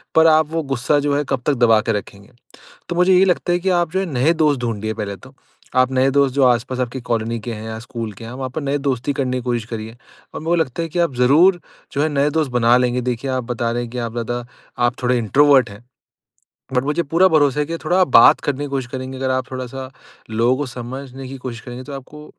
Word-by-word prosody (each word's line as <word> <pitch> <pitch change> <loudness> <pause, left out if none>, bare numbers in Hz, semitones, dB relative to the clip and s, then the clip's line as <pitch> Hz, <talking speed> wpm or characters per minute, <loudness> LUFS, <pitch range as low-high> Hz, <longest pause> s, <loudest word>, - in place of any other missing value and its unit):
पर 160 0 +6
आप 155 -1 +4
वो 165 0 -1
गुस्सा 135 +1 0
जो 145 0 0
है 145 - 0
कब 135 -2 -1
तक 150 - +3
दबा 120 -4 +4
के 115 - -1
रखेंगे। 100 0 -7 0.6
तो 175 - -3
मुझे 180 +1 +4
यही 185 +1 +6
लगता 180 -1 +1
है 175 - +2
कि 190 +1 -1
आप 175 -2 +1
जो 190 - 0
है 195 - -2
नए 135 +6 +3
दोस्त 145 -4 +2
ढूँढ़िए 110 -2 -3
पहले 105 -3 -4
तो। 130 +6 -16 0.4
आप 130 0 +3
नए 130 +1 +3
दोस्त 140 -1 +2
जो 140 - +3
आस-पास 125 +1 +1
आपकी 125 +1 -3
कॉलोनी 115 0 -1
के 120 +2 -5
हैं 110 0 -7
या 110 0 -5
स्कूल 115 -1 -6
के - - -8
हैं, 115 - -8
वहाँ 130 0 -5
पर 155 - -4
नई 140 +1 -1
दोस्ती 135 0 -1
करने 130 -2 -2
की - - -6
कोशिश 120 -2 -2
करिए। 110 +1 -6 0.4
और - - -4
मुझे 165 +3 0
लगता 140 +3 -5
है 165 - -3
कि 170 +3 -5
आप 170 -6 +1
ज़रूर 155 +9 +4 0.3
जो 140 - 0
है 155 - +2
नए 145 0 +1
दोस्त 155 -4 0
बना 120 0 +4
लेंगे। 125 0 +1
देखिए 125 +3 -3
आप 130 -1 -2
बता 115 -1 -1
रहे 120 +1 -2
हैं 120 - -7
कि 125 - -6
आप 115 -1 -3
ज़्यादा 120 +1 -4 0.4
आप 120 +2 -3
थोड़े 125 0 +2
इंट्रोवर्ट 130 +1 +4
हैं। 105 +4 -13 0.9
बट 125 0 +2
मुझे 150 +4 0
पूरा 170 +5 +3
भरोसा 150 -4 +3
है - - +1
कि 165 +2 -3
थोड़ा 175 +4 0
आप 185 - +3
बात 115 - +7
करने 145 0 -2
की - - -5
कोशिश 135 -3 -2
करेंगे 130 -1 -6
अगर 130 0 -1
आप 130 -1 -1
थोड़ा-सा 130 0 -6 0.4
लोगों 115 +3 +2
को 145 +1 -3
समझने 130 +2 -8
की 135 - -7
कोशिश 120 -2 -7
करेंगे 125 +1 -9
तो 145 - -9
आपको 150 +3 -10
130 Hz, 255 wpm, -20 LUFS, 120-145 Hz, 0.9 s, बात